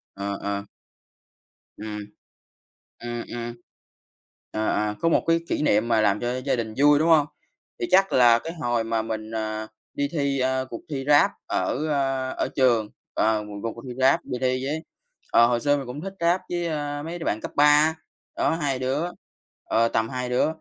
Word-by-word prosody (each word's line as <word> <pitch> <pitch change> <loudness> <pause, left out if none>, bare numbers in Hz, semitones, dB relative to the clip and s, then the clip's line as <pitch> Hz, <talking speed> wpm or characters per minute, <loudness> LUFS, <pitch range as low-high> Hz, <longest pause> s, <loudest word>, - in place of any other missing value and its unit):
Ờ, 100 0 -3
ờ. 100 0 -2 1.1
Ừm. 105 0 -6 1.0
Ừm, 120 0 -4
ừm. 120 0 -5 1.0
À, 110 0 -1
à, 105 0 -1
có 165 - +2
1 165 - +2
cái 165 0 +5
kỉ - - -1
niệm 110 -4 +2
mà 115 -2 +3
làm 105 -1 +2
cho 125 +1 -2
gia 135 -1 0
đình 110 -2 -4
vui, 145 0 +6
đúng 160 - +2
hông? 155 -3 +5 0.5
Thì - - 0
chắc 195 +1 +4
là 120 -2 +6
cái 165 +6 -6
hồi 120 -2 +1
mà 115 0 0
mình, 110 -1 -5
à, 110 0 -3 0.3
đi 140 0 0
thi, 140 -3 0
a, 130 0 +1
cuộc 115 - -6
thi 135 -2 -3
rap 145 -1 +6 0.2
ở, 150 +4 -1
ờ, 135 -2 0
ở - - -1
trường, 120 -5 +3 0.3
ờ, 110 -1 +2
một 105 0 -9
cuộc 115 - -2
cuộc 115 - -11
thi 125 - -6
rap, 130 +1 +4
đi 125 - -4
thi 130 0 0
với 155 +3 -3 0.5
ờ, 120 - +7
hồi 120 -1 +1
xưa 145 0 +3
mình 135 - -5
cũng 125 +4 -6
thích 195 0 -5
rap 170 +2 +3
với, 175 -1 -1
a, 145 -2 -3
mấy 170 +2 -5
đứa 165 - -6
bạn 110 - 0
cấp - - -6
3, 150 +2 +6 0.4
đó - - +2
2 145 -5 -1
đứa, 130 +3 -1 0.6
ờ, 115 +1 +2
tầm 115 0 0
2 125 0 -3
đứa, 125 0 +2
130 Hz, 200 wpm, -25 LUFS, 115-145 Hz, 1.1 s, ờ